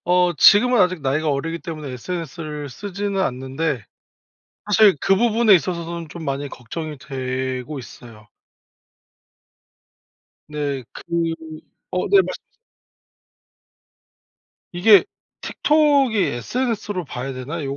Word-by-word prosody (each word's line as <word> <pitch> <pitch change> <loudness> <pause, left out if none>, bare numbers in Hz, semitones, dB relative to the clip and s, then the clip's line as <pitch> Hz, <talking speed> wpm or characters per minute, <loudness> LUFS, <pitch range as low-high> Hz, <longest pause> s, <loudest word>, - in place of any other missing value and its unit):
어 180 0 +3
지금은 240 - +6
아직 180 -3 +2
나이가 150 +3 0
어리기 165 +4 -2
때문에 155 -4 -6
SNS를 155 0 -6
쓰지는 200 +6 -4
않는데 130 - -2 0.8
사실 210 -2 +5
그 195 - +3
부분에 230 0 +4
있어서선 170 -2 -3
좀 165 0 -8
많이 140 0 -3
걱정이 150 +5 -7
되고 130 0 -4
있어요. 115 -3 -13 2.2
네. 145 -3 -3
그 - - -10 0.9
어 180 - -1
네, 395 -1 +6
말씀하세요. - - -8 2.2
이게 200 - +6 0.4
틱톡이 290 -6 +2
sns로 205 - -2
봐야 135 0 -5
되나 145 +6 -5
165 Hz, 230 characters per minute, -21 LUFS, 135-200 Hz, 2.2 s, 지금은